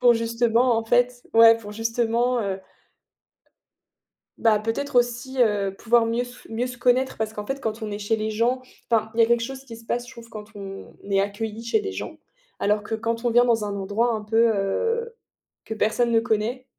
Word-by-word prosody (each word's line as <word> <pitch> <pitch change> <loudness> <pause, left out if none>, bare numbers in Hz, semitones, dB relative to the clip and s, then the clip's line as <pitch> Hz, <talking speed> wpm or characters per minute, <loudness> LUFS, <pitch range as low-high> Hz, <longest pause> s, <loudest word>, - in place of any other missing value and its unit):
pour, 245 -1 +6
justement, 230 +1 +2
en 225 - -3
fait 245 +1 +2
ouais, 230 0 +8
pour 205 -2 -10
justement, 230 +2 0
heu 195 -2 -2 1.8
bah, 220 -2 +4
peut-être 225 +6 -3
aussi, 245 +2 +1
heu, 205 -4 +1
pouvoir 235 0 +3
mieux 230 +1 0
s 245 0 -11
mieux 230 +3 -1
se 250 -1 -7
connaître 250 +2 +2
parce 220 -1 -2
qu'en 210 -1 -6
fait 270 +4 -3
quand 220 -1 -3
on 215 - -4
est 205 - -4
chez 210 +2 0
les 215 0 -2
gens 235 +4 +1 0.3
enfin, 220 -1 +2
il 230 - +1
y - - +9
a - - +5
quelque 235 0 +3
chose 265 +2 -6
qui 235 -4 -10
se 230 - -17
passe, 245 +1 -2
je 260 - -12
trouve, 235 -2 -12
quand 210 -2 -10
on 195 -1 -9 0.2
est 195 0 +3
accueilli 210 +3 -4
chez 235 - +1
des 405 -1 -4
gens, - - -6 0.4
alors 210 +1 +1
que 220 - -4
quand 230 +1 -2
on 240 - +2
vient 240 +1 +5
dans 225 -3 +2
un 205 -1 -3
endroit 205 +5 0
un 215 - -2
peu, 225 +1 +3
heu, 460 - -1 0.5
que - - -7
personne 225 +2 +1
ne 225 - +4
connaît 230 +2 -1
230 Hz, 215 wpm, -24 LUFS, 215-245 Hz, 1.8 s, y